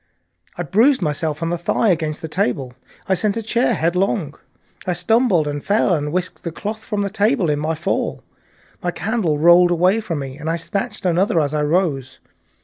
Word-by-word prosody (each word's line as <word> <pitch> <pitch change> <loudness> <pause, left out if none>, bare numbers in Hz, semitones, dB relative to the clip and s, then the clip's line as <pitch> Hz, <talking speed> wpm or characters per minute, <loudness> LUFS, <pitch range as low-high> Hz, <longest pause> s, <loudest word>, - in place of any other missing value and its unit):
I 175 - -2
bruised 220 - +3
myself 150 0 -2
in 165 - -1
the 175 0 -2
thigh 205 +5 +1
against 155 -4 -1
the - - -3
table, 130 -4 -1 0.3
I 190 - +2
sent 205 +3 0
a 225 - -3
chair 235 +1 +1
headlong, 175 -2 0 0.5
I 180 - +1
stumbled 200 -3 +2
and 145 -1 -4
fell 200 -2 +2
and 150 -2 -1
whisked 180 +1 -3
the 170 - -4
cloth 215 +6 -5
from 210 -2 -2
the 200 - -2
table 210 - +1
in 145 - -1
my 155 +2 -1
fall. 170 +5 -2 0.6
My 175 - -1
candle 180 -4 -1
rolled 175 +3 +6
away 180 +5 +2
from 170 -7 -4
me 135 0 -6
and 155 +2 -4
I 165 - +1
snatched 185 +4 -4
another 180 0 +2
as 145 -1 0
I 150 - 0
rose. 150 -5 0
175 Hz, 195 wpm, -20 LUFS, 155-200 Hz, 0.6 s, rolled